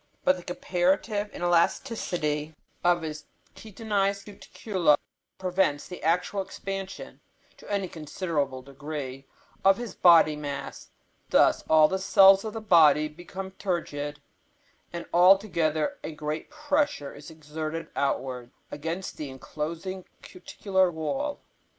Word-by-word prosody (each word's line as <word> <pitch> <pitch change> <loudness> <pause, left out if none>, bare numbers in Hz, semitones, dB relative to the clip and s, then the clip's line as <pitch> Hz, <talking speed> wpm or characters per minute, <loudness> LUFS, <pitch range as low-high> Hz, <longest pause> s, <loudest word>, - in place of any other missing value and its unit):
But 185 - +4
the 180 - -9
comparative 190 +4 0
inelasticity 170 - 0 0.3
of 175 -1 +3
his 155 -1 -6 0.3
chitinized 200 -2 -2
cuticula 190 -5 0 0.4
prevents 180 -6 0
the 180 - -9
actual 180 +4 +1
expansion, 195 0 -7 0.4
to - - -11
any 200 -2 0
considerable 150 -5 -3
degree, 135 -1 -7 0.4
of 195 0 +5
his 235 -5 -6
body 165 -3 +6
mass. 145 -2 -6 0.4
Thus - - +4
all 155 -1 +7
the 190 +3 -2
cells 195 0 +6
of 220 -1 -5
the 225 - -5
body 155 -6 +5
become 180 +4 -8
turgid, 150 -6 -3 0.7
and 170 0 -6
altogether 175 -4 +3
a - - -4
great 150 +1 -4
pressure 290 - -1
is 145 +2 -11
exerted 155 +1 -6
outwards 130 -3 -2 0.2
against 165 +5 -5
the 150 -3 -5
enclosing 165 +7 -6 0.2
cuticular 190 +1 -1
wall. 270 - -3
175 Hz, 115 wpm, -27 LUFS, 150-195 Hz, 0.7 s, all